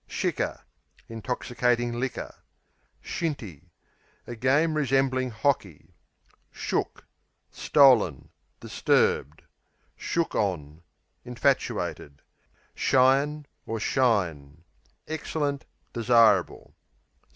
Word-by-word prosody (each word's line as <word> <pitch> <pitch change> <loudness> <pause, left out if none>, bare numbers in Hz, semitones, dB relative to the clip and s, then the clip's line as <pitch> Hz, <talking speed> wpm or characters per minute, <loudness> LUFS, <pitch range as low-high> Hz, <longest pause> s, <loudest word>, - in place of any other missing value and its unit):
Shicker - - -2 0.5
Intoxicating 120 +1 -1
liquor. 130 +1 -4 0.7
Shinty 105 - -5 0.6
A 120 - -7
game 140 +7 +2
resembling 135 -3 +1
hockey. 110 - -2 0.6
Shook - - -3 0.5
Stolen; 135 -7 +3 0.3
disturbed. 75 +4 0 0.5
Shook 170 -1 -2
on 80 -6 -2 0.4
Infatuated. 110 -10 -2 0.5
Shyin' 140 +3 +2 0.2
or 115 0 -3
Shine 85 - 0 0.4
Excellent; 145 -3 -3 0.3
desirable. 115 -5 +3
120 Hz, 65 wpm, -26 LUFS, 100-135 Hz, 0.7 s, Stolen